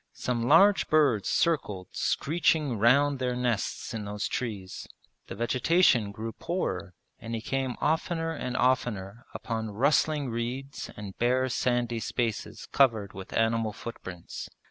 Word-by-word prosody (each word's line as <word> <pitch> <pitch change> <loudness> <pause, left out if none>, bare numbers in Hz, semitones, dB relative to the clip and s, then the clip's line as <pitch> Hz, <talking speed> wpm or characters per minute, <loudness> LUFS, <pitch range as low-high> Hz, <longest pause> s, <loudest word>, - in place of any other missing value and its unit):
Some 120 -2 -2
large 195 +7 +6
birds 140 -10 +3
circled 105 - 0
screeching 155 -5 +1
round 140 +5 +4
their 125 -1 -1
nests 120 -4 -2
in 110 -2 -4
those 105 0 -3
trees. 105 -7 -5 0.4
The - - -7
vegetation 120 - +3
grew 110 +2 -5
poorer 95 - -3 0.2
and 115 0 -5
he - - -2
came 130 +1 -2
oftener 165 +1 0
and 125 -4 -4
oftener 120 -4 0
upon 110 -2 -3
rustling 140 +4 +1
reeds 125 +4 -4
and 100 -2 -7
bare 130 +2 +2
sandy 120 -2 0
spaces 110 -1 -3
covered 110 -7 +3
with 95 0 -9
animal 115 -1 +1
footprints. 95 -6 -8
120 Hz, 130 wpm, -28 LUFS, 110-135 Hz, 0.4 s, large